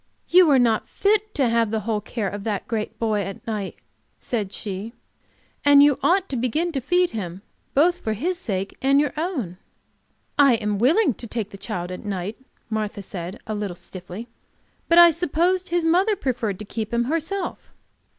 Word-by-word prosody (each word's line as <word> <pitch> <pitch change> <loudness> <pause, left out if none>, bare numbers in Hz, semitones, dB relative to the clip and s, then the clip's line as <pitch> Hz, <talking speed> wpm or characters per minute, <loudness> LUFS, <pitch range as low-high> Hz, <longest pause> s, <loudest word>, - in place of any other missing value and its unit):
"You 360 -2 +7
are 280 - +6
not 230 -3 +2
fit 425 +1 +1
to 275 -4 +2
have 230 -1 +2
the 220 0 -1
whole 215 0 -1
care 215 0 -3
of 200 +1 -5
that 205 -3 -3
great 220 -1 -3
boy 215 -2 0
at 195 0 -7
night," 210 -4 -3 0.4
said 210 -6 -3
she, 205 +2 -5 0.7
"and 285 0 +7
you 290 -2 +4
ought 380 +1 +3
to 270 - -3
begin 255 +9 0
to 275 -4 -2
feed 355 +6 +2
him, 190 -4 -5 0.3
both 345 +5 +4
for 220 - -2
his 345 - -2
sake 195 - -3
and 275 +1 +4
your 295 0 +1
own." 295 - -3 0.8
"I 275 -4 +7
am 210 -3 -2
willing 290 - +4
to 235 - -8
take 215 -2 -4
the - - -9
child 185 -3 -5
at 180 - -7
night," 200 +1 -4 0.3
Martha 215 -2 -3
said, 180 +2 -7
a 215 - -4
little 205 -4 -3
stiffly. 180 +5 -9 0.6
"But 335 - +5
I 345 0 +10
supposed 355 +3 0
his 345 -1 +1
mother 370 +6 +3
preferred 235 - -2
to 210 - -8
keep 220 +1 -4
him 235 0 +1
herself." 330 +7 -3
230 Hz, 185 wpm, -23 LUFS, 205-325 Hz, 0.8 s, I